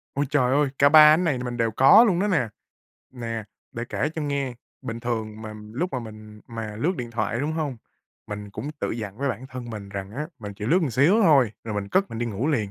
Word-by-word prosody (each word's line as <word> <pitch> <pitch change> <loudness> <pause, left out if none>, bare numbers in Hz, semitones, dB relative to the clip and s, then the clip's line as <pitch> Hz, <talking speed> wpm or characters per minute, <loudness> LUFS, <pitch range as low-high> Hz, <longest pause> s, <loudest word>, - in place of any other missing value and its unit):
Ôi 145 +1 +1
trời 130 -4 +2
ơi. 145 -1 +3
Cả 140 +1 +6
ba 155 0 +9
ánh 175 +3 +2
này 150 -7 +1
thì 125 - -5
mình 120 0 -4
đều 115 -1 +1
có 135 - +7
luôn 185 -7 +2
đó 205 - +1
nè. 150 - +1 0.7
Nè, 115 -3 -5 0.3
để 120 0 -4
kể 145 - -1
cho 160 - -3
nghe, 140 -3 -2 0.3
bình 115 +1 -5
thường 110 -2 -3
mà 110 -1 -7 0.2
lúc 175 +10 -2
mà 130 - -1
mình 110 -2 -10
mà 110 -3 -6
lướt 170 - 0
điện 120 -1 -5
thoại, 115 +1 -2
đúng 150 +2 -1
hông? 150 -6 -2 0.5
Mình 105 -1 -7
cũng 145 +8 -5
tự - - -1
dặn 105 -2 -5
với 140 0 0
bản 125 +2 -4
thân 125 -3 -8
mình 105 -2 -7
rằng 100 -1 -6
á, 150 +8 -4
mình 105 -2 -7
chỉ 105 +1 -7
lướt 165 +9 +4
một 140 - 0
xíu 160 - +4
thôi 135 - +5
rồi 110 -2 -4
mình 100 -1 -3
cất 195 - +1
mình 115 - -5
đi 120 - -1
ngủ 115 +5 -2
liền. 110 -10 0
120 Hz, 255 wpm, -24 LUFS, 110-145 Hz, 0.7 s, ba